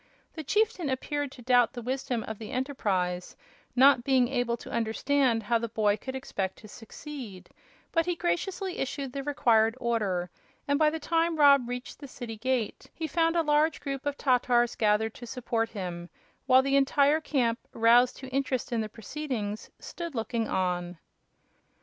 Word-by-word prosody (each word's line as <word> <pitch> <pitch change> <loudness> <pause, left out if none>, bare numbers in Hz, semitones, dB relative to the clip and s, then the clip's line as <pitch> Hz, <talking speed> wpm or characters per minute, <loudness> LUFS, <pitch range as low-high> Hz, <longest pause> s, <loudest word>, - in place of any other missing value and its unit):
The 315 - -6
chieftain 410 - +1
appeared 285 +2 -2
to 245 - -13
doubt 245 -1 +4
the 245 - -6
wisdom 250 -2 -2
of 220 -1 -7
the 220 - -7
enterprise, 200 -10 -2 0.4
not 265 -1 +6
being 260 -2 +3
able 245 -3 0
to - - -11
understand 235 +1 +1
how 230 +3 +1
the 230 0 -4
boy 210 -2 +2
could 260 +4 -7
expect 195 -7 -3
to 215 - -13
succeed; 225 -2 -10 0.4
but 330 0 +1
he 355 - 0
graciously 365 - -2
issued 270 -1 -3
the 275 - -3
required 230 -5 +2
order, 200 -7 -1 0.4
and 285 +1 +2
by 310 -1 +5
the 320 +1 -4
time 330 +2 +1
Rob 280 -5 +5
reached 250 +1 -6
the 285 - -9
city 240 -3 -7
gate 245 -1 -2
he 325 - -3
found 330 +2 +1
a 335 - +3
large 300 +1 +2
group 275 -1 -4
of 285 0 -2
Tatars 245 -2 +2
gathered 215 0 +2
to 240 - -10
support 230 -2 -2
him, 175 -5 -6 0.4
while 260 0 +6
the 275 0 +1
entire 285 +2 +3
camp, 240 -7 0
roused 235 +2 +4
to 265 - -9
interest 260 -2 -1
in 235 -2 0
the 215 - -4
proceedings, 225 -2 -5
stood 335 -4 -7
looking 225 0 -2
on. 180 -1 -1
250 Hz, 170 wpm, -28 LUFS, 225-285 Hz, 0.4 s, not